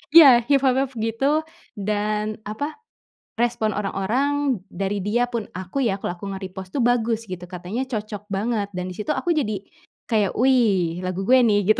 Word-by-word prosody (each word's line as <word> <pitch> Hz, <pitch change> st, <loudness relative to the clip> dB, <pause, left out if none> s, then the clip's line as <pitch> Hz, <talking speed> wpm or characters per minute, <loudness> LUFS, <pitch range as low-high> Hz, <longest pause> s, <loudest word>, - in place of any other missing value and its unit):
Iya, 255 Hz, -8 st, +9 dB
hiphop 270 Hz, -2 st, +3 dB
hip 265 Hz, -, -20 dB
gitu, 250 Hz, +8 st, +1 dB, 0.3 s
dan, 210 Hz, +1 st, -1 dB
apa, 285 Hz, -, -4 dB, 0.6 s
respon 235 Hz, -2 st, +1 dB
orang-orang, 250 Hz, +6 st, 0 dB
dari 195 Hz, 0 st, -2 dB
dia 240 Hz, +5 st, 0 dB
pun 230 Hz, -3 st, -3 dB
aku 185 Hz, +8 st, -4 dB
ya, 225 Hz, -7 st, +2 dB
kalau -, -, -1 dB
aku 200 Hz, -, -6 dB
nge-repost 190 Hz, -1 st, -8 dB
tuh, 265 Hz, -, +2 dB
bagus, 230 Hz, -1 st, +2 dB
gitu. 185 Hz, -3 st, -7 dB
Katanya 185 Hz, +9 st, -4 dB
cocok 210 Hz, -4 st, -5 dB
banget. 205 Hz, +1 st, -1 dB
Dan 180 Hz, 0 st, -3 dB
di -, -, -8 dB
situ 295 Hz, +8 st, -1 dB
aku 350 Hz, -, 0 dB
jadi 215 Hz, -, 0 dB, 0.5 s
kayak, 210 Hz, -4 st, +2 dB
"Wih 210 Hz, -10 st, +3 dB
lagu 185 Hz, +1 st, -3 dB
gue 255 Hz, +5 st, +5 dB
nih" 210 Hz, -4 st, +4 dB
Gitu. -, -, +2 dB
215 Hz, 170 wpm, -23 LUFS, 195-250 Hz, 0.6 s, Iya